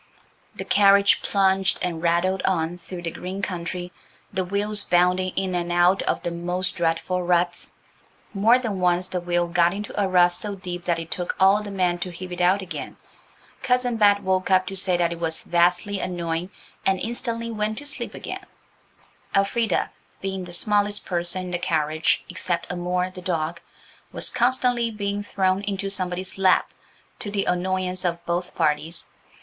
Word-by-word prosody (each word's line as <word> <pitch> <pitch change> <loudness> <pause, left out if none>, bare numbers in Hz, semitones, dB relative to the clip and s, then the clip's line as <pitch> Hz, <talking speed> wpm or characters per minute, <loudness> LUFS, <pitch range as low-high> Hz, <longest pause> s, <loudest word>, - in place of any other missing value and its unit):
The - - -6
carriage 200 0 +5
plunged 190 -2 +2
and 175 -3 -2
rattled 175 +3 +1
on 175 -1 0
through 175 +1 -7
the 165 - -2
green 190 +4 -6
country, 180 -1 -4 0.4
the 190 -1 0
wheels 200 +2 -1
bounding 180 +1 +3
in 190 -1 -1
and 175 -1 -1
out 175 +2 +4
of - - -1
the 175 - -2
most 180 +2 -2
dreadful 170 +2 0
ruts. 175 0 0 0.6
More 220 +5 +5
than 225 -7 -3
once 180 0 +2
the 180 - -2
wheel 175 0 0
got 170 +1 +2
into 205 +1 -6
a 195 - +2
rut 180 -1 +5
so 200 +3 -3
deep 180 -2 -6
that 170 -2 +1
it 165 0 -7
took 180 -1 -2
all 195 +2 +5
the 210 - -7
men 180 -3 0
to 180 - -3
heave 180 +1 -8
it 180 0 -4
out 190 +2 +3
again. 180 - -7 0.6
Cousin 250 -2 +1
Bet 205 -2 +4
woke 185 0 0
up 185 -1 +4
to 195 - -5
say 185 -2 +2
that 170 -1 +1
it 170 - -5
was 160 -1 0
vastly 175 +3 +2
annoying, 175 -1 -3 0.3
and 190 -1 +2
instantly 230 +1 -3
went 215 0 -2
to 290 - -7
sleep 290 - -4
again. - - -7 0.9
Elfrida, 200 +1 +1 0.3
being 190 -1 -4
the 175 - -9
smallest 205 +2 +1
person 175 +1 -1
in 180 - -6
the 175 - -1
carriage 155 -1 +1
except 180 -2 -2
Amour, 180 +1 -1
the 185 -1 -9
dog, 170 -1 -2 0.5
was - - +1
constantly 245 -1 +2
being 205 -2 -2
thrown 190 -1 0
into 200 -1 -3
somebody's 185 0 -3
lap–to 190 +2 -1
the 200 -1 -1
annoyance 185 0 -1
of 170 -1 -2
both 175 +1 -2
parties. 160 +1 0
185 Hz, 170 wpm, -24 LUFS, 175-200 Hz, 0.9 s, carriage